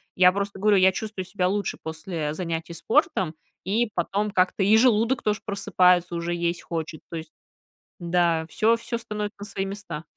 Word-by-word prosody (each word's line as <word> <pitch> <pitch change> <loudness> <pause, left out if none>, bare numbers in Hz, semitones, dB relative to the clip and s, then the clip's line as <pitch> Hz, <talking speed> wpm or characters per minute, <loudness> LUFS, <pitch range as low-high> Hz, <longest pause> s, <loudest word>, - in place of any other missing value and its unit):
я 180 0 +6
просто 200 0 -3
говорю, 210 0 +4
я 190 0 +6
чувствую 210 -1 -5
себя 180 -1 -1
лучше 200 0 -1
после 160 -1 -4
занятий 165 0 -4
спортом, 190 - +1 0.3
и 220 +4 +1
потом 200 +4 -1
как-то 185 +1 +2
и 205 +3 +5
желудок 235 +1 +3
тоже 210 0 0
просыпается, 180 -3 +2
уже 170 +1 -2
есть 170 0 -2
хочет. 160 -2 -5
То 165 - -5
есть 160 0 -8 0.7
да, 170 -2 +1
всё 225 +7 +3
всё 230 0 -4
становится 210 -2 -5
на 205 - -6
свои 195 -1 -3
места. 195 -6 -6
190 Hz, 170 wpm, -25 LUFS, 170-210 Hz, 0.7 s, я